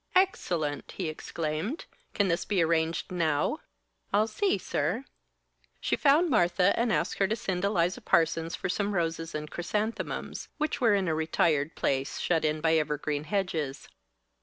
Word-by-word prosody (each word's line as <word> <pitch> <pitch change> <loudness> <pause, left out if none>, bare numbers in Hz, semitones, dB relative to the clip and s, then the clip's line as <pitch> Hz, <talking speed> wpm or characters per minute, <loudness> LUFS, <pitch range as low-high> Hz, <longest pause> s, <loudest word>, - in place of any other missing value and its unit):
"Excellent!" 170 - +1
he 180 -5 -3
exclaimed. 160 - -3 0.3
"Can 205 - +3
this 170 -1 +1
be 190 -3 +1
arranged 165 +1 0
now?" 165 - +1 0.5
"I'll 210 +2 +4
see, 380 - +1
sir." 185 - -1 0.7
She - - 0
found 300 +5 +4
Martha 185 - +3
and 235 -1 +1
asked 165 +1 0
her 195 - +4
to 215 - 0
send 190 -5 -3
Eliza 185 -3 +1
Parsons 165 0 +2
for - - -3
some 200 +2 -1
roses 165 -2 -1
and 150 0 -5
chrysanthemums, 210 +6 -3
which 305 -2 -1
were 230 -4 +5
in 195 -2 0
a 160 - +1
retired 155 -1 +1
place 135 0 -1
shut 165 -2 +1
in 155 0 0
by 160 0 +4
evergreen 150 -1 -1
hedges. 165 -8 -2
170 Hz, 155 wpm, -29 LUFS, 155-205 Hz, 0.7 s, were